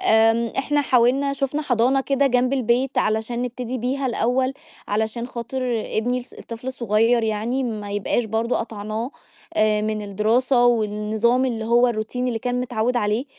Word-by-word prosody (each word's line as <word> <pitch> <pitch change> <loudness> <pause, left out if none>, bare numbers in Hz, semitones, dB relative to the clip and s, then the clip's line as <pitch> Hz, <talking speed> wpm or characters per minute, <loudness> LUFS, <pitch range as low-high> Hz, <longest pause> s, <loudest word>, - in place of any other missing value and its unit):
آمم 225 +1 +3
إحنا 290 +2 +1
حاولنا 265 +1 +3
شوفنا 280 +2 -2
حضانة 255 +1 +2
كده 275 +1 +1
جنب 250 0 +2
البيت 255 0 +1
علشان 220 +3 0
نبتدي 250 0 -4
بيها 265 +3 -1
الأول، 255 +2 +1 0.4
علشان 220 +3 -1
خاطر 240 +1 -5 0.3
ابني 245 +3 -1
الص 245 - -15
الطفل 230 +2 -9
الصغيّر 235 -2 +2
يعني 225 +4 -1
ما 215 -4 -4
يبقاش 205 +4 0
برضه 225 +2 -1
قطعناه، 220 +2 -4 0.4
آآ، 215 0 +3
من 215 0 -2
الدراسة 235 +5 +2
والنظام 220 +2 +1
اللي 230 -4 -2
هو 240 +2 +4
الروتين 240 +2 -2
اللي 235 -2 -1
كان 250 +1 -2
متعود 245 0 -1
عليه، 215 +2 0
235 Hz, 150 wpm, -22 LUFS, 220-255 Hz, 0.4 s, هو